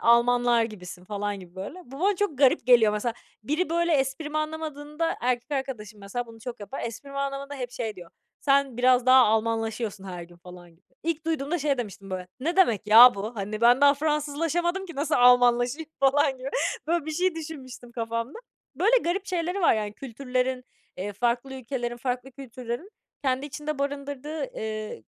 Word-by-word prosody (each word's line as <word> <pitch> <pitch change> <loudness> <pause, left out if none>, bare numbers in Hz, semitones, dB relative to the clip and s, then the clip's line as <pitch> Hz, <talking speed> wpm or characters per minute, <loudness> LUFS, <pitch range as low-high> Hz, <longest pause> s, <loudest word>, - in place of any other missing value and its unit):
"Almanlar 235 0 +4
gibisin." 180 -4 -9
falan 205 0 -3
gibi, 180 0 -14
böyle. 240 - -7
Bu 270 +4 -11
bana 395 +1 +2
çok 340 -10 -1
garip 260 -4 +4
geliyor, 230 -4 +6
mesela. 225 +2 -1 0.3
Biri, 315 +8 -1
böyle, 340 0 +2
esprimi 295 +2 0
anlamadığında, 310 0 -3
erkek 245 +2 -1
arkadaşım 235 -6 -4
mesela 235 +5 -4
bunu 225 -1 -14
çok 240 -1 -7
yapar, 235 +7 -6
esprimi 275 +5 -6
anlamadığında 275 +1 -3
hep 250 -3 -5
şey 225 -5 -4
diyor: 175 -2 -11 0.3
"Sen 275 -3 +2
biraz 250 0 +4
daha 260 +1 +8
Almanlaşıyorsun 225 -2 -1
her 180 -2 -6
gün." 170 0 -14
falan 175 0 -13
gibi. 165 +3 -28 0.2
İlk 325 0 -2
duyduğumda 320 +1 -1
şey 280 -2 0
demiştim 195 -4 -6
böyle, 185 -1 -4
"Ne 335 +6 -1
demek 225 - +3
ya 235 +3 +9
bu?" 215 +4 -5
Hani, 210 +2 -4
ben 245 +3 +6
daha 285 0 +7
Fransızlaşamadım 315 +5 -1
ki 340 - -9
nasıl 300 +2 0
Almanlaşayım 245 +4 +4
falan 275 0 +3
gibi. 260 +1 -5 0.4
Böyle 335 -2 0
bir - - -2
şey 355 +2 +1
düşünmüştüm 265 -7 -8
kafamda. 230 - -3 0.4
Böyle 430 - +4
garip 370 +3 -1
şeyleri 360 +1 -2
var, 335 - +5
yani, 210 -1 -2
kültürlerin, 255 0 -2 0.3
eee, 205 +3 -4
farklı 245 +5 -1
ülkelerin, 240 -1 -4
farklı 250 +1 -3
kültürlerin 255 - -7 0.3
kendi 265 +2 0
içinde 295 +1 -5
barındırdığı, 285 +1 -3
eee, 215 - -5
255 Hz, 170 wpm, -26 LUFS, 225-295 Hz, 0.4 s, ya